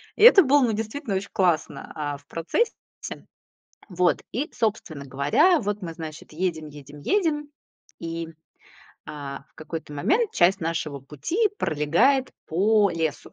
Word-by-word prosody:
И 420 Hz, -, +1 dB
это 430 Hz, -5 st, +10 dB
было, 285 Hz, 0 st, +4 dB
ну, 230 Hz, -3 st, +2 dB
действительно 220 Hz, +2 st, -3 dB
очень 195 Hz, +1 st, -3 dB
классно, 175 Hz, -5 st, 0 dB
а, 145 Hz, -2 st, -3 dB
в 145 Hz, -, -23 dB
процессе. 170 Hz, -, -3 dB, 0.6 s
Вот, 180 Hz, -1 st, +2 dB
и, 280 Hz, -, -2 dB
собственно 200 Hz, -10 st, -2 dB
говоря, 145 Hz, -, +3 dB
вот 205 Hz, 0 st, -2 dB
мы, 170 Hz, -3 st, -5 dB
значит, 155 Hz, -1 st, -9 dB
едем, 160 Hz, -2 st, -2 dB
едем, 145 Hz, 0 st, -12 dB
едем, 300 Hz, -, 0 dB, 0.5 s
и, 165 Hz, 0 st, -4 dB
м, 165 Hz, -, -14 dB, 0.7 s
а, 140 Hz, -2 st, -7 dB
в -, -, -39 dB
какой-то 160 Hz, -1 st, -7 dB
момент 405 Hz, -, +1 dB
часть 175 Hz, +3 st, +3 dB
нашего 160 Hz, -3 st, -3 dB
пути 150 Hz, -, -1 dB
пролегает 175 Hz, -, +2 dB, 0.2 s
по 205 Hz, +4 st, +3 dB
лесу 160 Hz, -3 st, -3 dB
170 Hz, 145 wpm, -25 LUFS, 150-240 Hz, 0.7 s, это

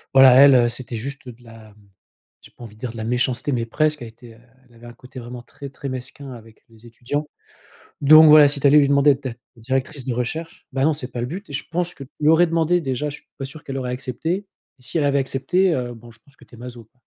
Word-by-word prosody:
voilà, 135 Hz, -1 st, +8 dB
elle, 140 Hz, +1 st, +7 dB
heu, 120 Hz, -1 st, +4 dB
c'était 120 Hz, -1 st, -8 dB
juste 135 Hz, +2 st, -7 dB
de 120 Hz, +1 st, -14 dB
la, 115 Hz, -2 st, -15 dB
mmh, -, -, -28 dB, 0.7 s
j'ai -, -, -17 dB
pas -, -, -12 dB
envie 110 Hz, -2 st, -11 dB
de 110 Hz, -, -22 dB
dire 125 Hz, -2 st, -5 dB
de 115 Hz, -, -11 dB
la 110 Hz, -, -5 dB
méchanceté 125 Hz, +3 st, -1 dB
mais 115 Hz, -2 st, -1 dB
presque. 150 Hz, +4 st, -1 dB
Elle -, -, -7 dB
était 115 Hz, 0 st, -16 dB, 0.3 s
elle 120 Hz, -, -23 dB
avait 115 Hz, +1 st, -16 dB
un 120 Hz, -, -11 dB
côté 125 Hz, +2 st, -12 dB
vraiment 120 Hz, 0 st, -9 dB
très, 140 Hz, +3 st, -11 dB
très 140 Hz, 0 st, -7 dB
mesquin 130 Hz, +2 st, -8 dB
avec 115 Hz, -2 st, -15 dB
les 115 Hz, +1 st, -18 dB
étudiants, 135 Hz, +6 st, -5 dB, 0.7 s
donc 155 Hz, +2 st, +8 dB
voilà, 150 Hz, -1 st, +8 dB
si 145 Hz, 0 st, -3 dB
tu 140 Hz, -, -4 dB
allais 150 Hz, +2 st, +6 dB
lui 140 Hz, -, +3 dB
demander 140 Hz, +1 st, +4 dB
d'être 140 Hz, -, -18 dB, 0.3 s
ta 115 Hz, -, -20 dB
directrice 130 Hz, +2 st, -3 dB
de 130 Hz, -, -2 dB
recherche, 125 Hz, +8 st, -5 dB
bah, 135 Hz, -, 0 dB
non, 155 Hz, +2 st, +3 dB
c'est 130 Hz, -3 st, -8 dB
pas 120 Hz, -, -5 dB
le 120 Hz, -, -3 dB
but 190 Hz, +9 st, -7 dB
et 145 Hz, -, -9 dB
je -, -, -3 dB
pense 175 Hz, +1 st, -2 dB
que 140 Hz, -, -10 dB
tu 130 Hz, -, -24 dB
lui 150 Hz, -, +3 dB
aurais 170 Hz, +2 st, +5 dB
demandé 165 Hz, +1 st, +1 dB
déjà, 135 Hz, +1 st, -3 dB
je 145 Hz, -, -8 dB
suis -, -, -35 dB
pas 135 Hz, -, -5 dB
sûr 145 Hz, +3 st, -11 dB
qu'elle 135 Hz, -1 st, -6 dB
aurait 125 Hz, -2 st, -4 dB
accepté, 135 Hz, +10 st, -4 dB, 0.3 s
et -, -, -22 dB
si 145 Hz, -, -4 dB
elle 155 Hz, -, +1 dB
avait 140 Hz, 0 st, +2 dB
accepté, 160 Hz, +8 st, 0 dB
heu, 120 Hz, -1 st, -4 dB
bon, 120 Hz, +1 st, -14 dB
je 115 Hz, -, -16 dB
pense 140 Hz, -, -14 dB
que -, -, -19 dB
tu -, -, -17 dB
es -, -, -16 dB
maso, 120 Hz, -1 st, -10 dB
quoi. 125 Hz, +4 st, -41 dB
130 Hz, 275 wpm, -21 LUFS, 120-145 Hz, 0.7 s, voilà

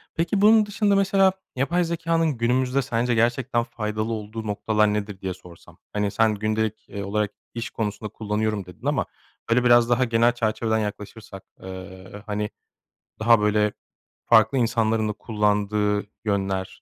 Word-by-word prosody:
Peki 175 Hz, +5 st, 0 dB
bunun 215 Hz, +1 st, +6 dB
dışında, 205 Hz, -1 st, +1 dB
mesela 195 Hz, -1 st, +3 dB, 0.2 s
yapay 170 Hz, +7 st, +1 dB
zekânın 165 Hz, -3 st, 0 dB
günümüzde 125 Hz, +3 st, +1 dB
sence 120 Hz, -1 st, 0 dB
gerçekten 120 Hz, +1 st, +1 dB
faydalı 110 Hz, -1 st, -3 dB
olduğu 110 Hz, 0 st, -6 dB
noktalar 105 Hz, 0 st, +1 dB
nedir 105 Hz, -2 st, -4 dB
diye 95 Hz, -1 st, -3 dB
sorsam? 90 Hz, -2 st, -16 dB, 0.2 s
Hani 105 Hz, -1 st, 0 dB
sen 110 Hz, -1 st, +2 dB
gündelik, 110 Hz, +1 st, -2 dB
eee, 100 Hz, -, -5 dB
olarak 105 Hz, +1 st, -1 dB, 0.2 s
iş 115 Hz, -1 st, -4 dB
konusunda 105 Hz, -1 st, -4 dB
kullanıyorum, 105 Hz, -1 st, -2 dB
dedin 90 Hz, -1 st, -14 dB
ama -, -, +1 dB, 0.4 s
böyle 120 Hz, +2 st, +3 dB
biraz 120 Hz, -1 st, +5 dB
daha 120 Hz, +1 st, +3 dB
genel 115 Hz, 0 st, +3 dB
çerçeveden 110 Hz, -1 st, 0 dB
yaklaşırsak, 105 Hz, -1 st, -6 dB, 0.2 s
eee, 95 Hz, +2 st, -9 dB
hani, 105 Hz, 0 st, -2 dB, 0.7 s
daha, 115 Hz, 0 st, +5 dB
böyle, 105 Hz, 0 st, +2 dB, 0.5 s
farklı 110 Hz, +2 st, +5 dB
insanların 115 Hz, -2 st, +1 dB
da -, -, -2 dB
kullandığı 105 Hz, -1 st, 0 dB, 0.2 s
yönler, 95 Hz, -2 st, -2 dB
110 Hz, 145 wpm, -24 LUFS, 105-120 Hz, 0.7 s, bunun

